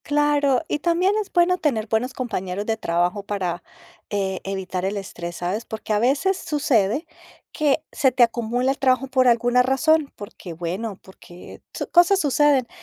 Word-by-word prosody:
Claro, 290 -2 +2
y 295 - -2
también 345 +5 +2
es 405 - -9
bueno 355 +1 +3
tener 235 -9 0
buenos 235 +4 -1
compañeros 200 -6 -4
de 225 - 0
trabajo 175 -1 -1
para 185 -4 -3 0.5
e 190 -2 -2
evitar 190 -2 -4
el 195 +2 -2
estrés, 175 -3 -7
¿sabes? 185 +6 -3
Porque 220 -1 -4
a 210 - +2
veces 275 - +2
sucede 275 - 0 0.5
que 305 0 +1
se 265 - +2
te 250 0 +4
acumula 240 +2 0
el 275 - -4
trabajo 265 0 +2
por 255 -1 +2
alguna 245 +1 +3
razón, 285 +3 +2
porque, 200 -3 -9
bueno, 185 +5 -4
porque 180 -2 -14
su - - -4
cosas 355 +2 +5
suceden, 290 -4 +2
240 Hz, 165 wpm, -22 LUFS, 195-290 Hz, 0.5 s, cosas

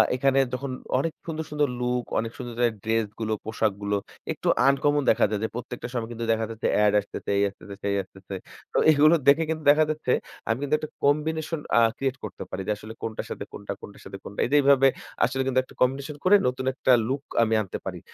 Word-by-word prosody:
এখানে 135 +1 +2 0.2
যখন 135 +1 -3 0.3
অনেক 165 +3 -1
সুন্দর 160 -1 -3
সুন্দর 150 -1 +2
লুক, 125 0 0 0.2
অনেক 115 +1 -3
সুন্দর, 120 -2 -6
সুন্দর 120 -2 +1
ড্রেস 110 0 +1
গুলো, 110 -1 -1
পোশাকগুলো 105 -2 -1 0.4
একটু - - -5 0.2
আনকমন 145 +1 +3
দেখা - - +4
যায় 105 -1 -1
যে - - +1
প্রত্যেকটা 125 0 -5
সময় 115 -2 -3
কিন্তু 115 0 -4
দেখা 110 0 +1
যাচ্ছে 115 0 -2 0.2
এড 105 -1 +4
আসতেছে, 100 - -7
এই 100 - +3
আসতেছে, 100 0 -11
সেই 100 0 0
আসতেছে। 95 0 -12 0.4
তো - - 0
এগুলো 155 +2 +6
দেখে 145 +4 +6
কিন্তু 160 -1 -2
দেখা 155 +2 +4
যাচ্ছে 155 -4 -1 0.4
আমি 115 - +2
কিন্তু 145 +1 +2
একটা 155 - -6
combination 155 +2 +1 0.2
আ - - +7 0.2
create 135 -1 -1
করতে - - -6
পারি 95 - -4
যে - - +1
আসলে 110 +1 -9
কোনটার 110 -1 -4
সাথে - - -4
কোনটা 100 0 -6
কোনটার 100 - -12
সাথে 95 - -8
কোনটা। 100 - -9
এইটা 140 - +1
এইভাবে 135 -1 +6 0.4
আসলে 135 +1 -1
কিন্তু 130 -1 +2
একটা - - -18
combination 135 +3 0
করে 190 +3 +7
নতুন 130 +1 -2
একটা 130 - +3 0.2
লুক 135 +1 -1 0.2
আমি 115 0 +1
আনতে 95 - -5
পারি। - - -4
125 Hz, 210 wpm, -26 LUFS, 110-145 Hz, 0.4 s, আ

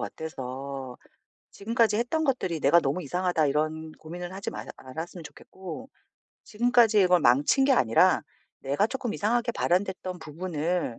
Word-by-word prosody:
같아서 135 -3 -6 0.6
지금까지 225 +1 +1
했던 245 +8 0
것들이 215 - -1
'내가 150 +4 +5
너무 145 +3 -1
이상하다.' 175 0 0
이런 155 +2 -1
고민을 175 +3 -8
하지 195 +1 -5
말았 - - -7
않았으면 160 +6 -8
좋겠고 190 - -10 0.6
지금까지 235 -1 +3
이걸 180 -1 +4
망친 145 - +4
게 275 - +4
아니라 115 - +4 0.4
내가 140 +10 +1
쪼끔 245 -2 -4
이상하게 235 +3 0
발현됐던 185 -1 -1
부분을 165 -3 -3
175 Hz, 345 characters per minute, -27 LUFS, 150-215 Hz, 0.6 s, 내가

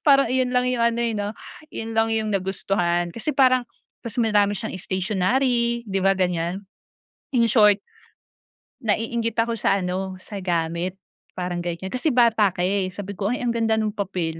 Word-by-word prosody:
parang 275 -1 +6
iyon 255 -1 +1
lang 250 - +3
yung 235 -2 0
ano, 235 0 +2
eh, 230 - 0
'no, 205 0 -2 0.4
yun 225 0 -5
lang 225 0 +3
yung 215 -1 -1
nagustuhan. 180 -2 0
Kasi 230 +6 -2
parang 255 -2 +5 0.4
ta's 235 -2 -6
marami 210 -3 +3
siyang 220 -2 -4
stationary, 235 +6 0
'di 195 -1 -1
ba 195 - +4
ganiyan. 180 -1 0 0.8
In 235 - +5
short, 210 -3 +6 1.0
naiinggit 230 0 -1
ako 230 0 -1
sa - - +3
ano, 185 +1 -3
sa 205 -2 -6
gamit, 175 0 -1 0.4
parang 180 -1 -3
ganiyan. 175 +2 -4
Kasi 255 +5 0
bata 230 -4 +5
ka, 175 - -1
eh. 190 0 +1
Sabi 200 -1 -6
ko, 200 - -1
"Ay, 250 - -3
ang 240 - +1
ganda 225 -1 +1
nung 215 -1 0
papel, 180 -5 -3
210 Hz, 170 wpm, -23 LUFS, 185-235 Hz, 1.0 s, parang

